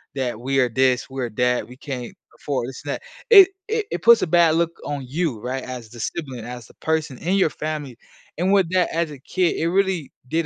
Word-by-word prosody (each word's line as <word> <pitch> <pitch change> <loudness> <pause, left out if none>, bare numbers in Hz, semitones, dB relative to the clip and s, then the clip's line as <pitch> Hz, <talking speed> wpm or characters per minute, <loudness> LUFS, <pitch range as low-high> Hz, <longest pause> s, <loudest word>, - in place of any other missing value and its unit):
that 125 -5 -2
we 135 +2 0
are 125 -2 +3
this, 130 +2 +1
we 135 0 -5
are 120 - -2
that, 125 +2 0
we 125 +1 -13
can't 130 -4 -6 0.2
afford 130 -4 -2
this 130 - -9
and 140 - -2
that. - - -6 0.3
It 390 -3 +10 0.2
it 445 -1 0
it - - -3
puts 235 0 +7
a - - 0
bad 165 -1 +4
look 170 0 +1
on 145 -2 -4
you, 145 -4 -1
right, 130 +1 -3
as 125 -3 -7
the 120 0 -12
sibling, 135 -8 -4
as 120 -1 -8
the - - -19
person 160 -5 -2
in 185 +4 0
your 190 -5 +3
family, 150 -5 -5 0.4
and 185 +3 +1
with 190 -4 +3
that 185 -2 +2
as 165 -2 0
a 145 - -10
kid, 180 +5 0
it 165 - 0
really 190 -5 0 0.2
did 165 +2 0
145 Hz, 235 wpm, -22 LUFS, 125-170 Hz, 0.4 s, It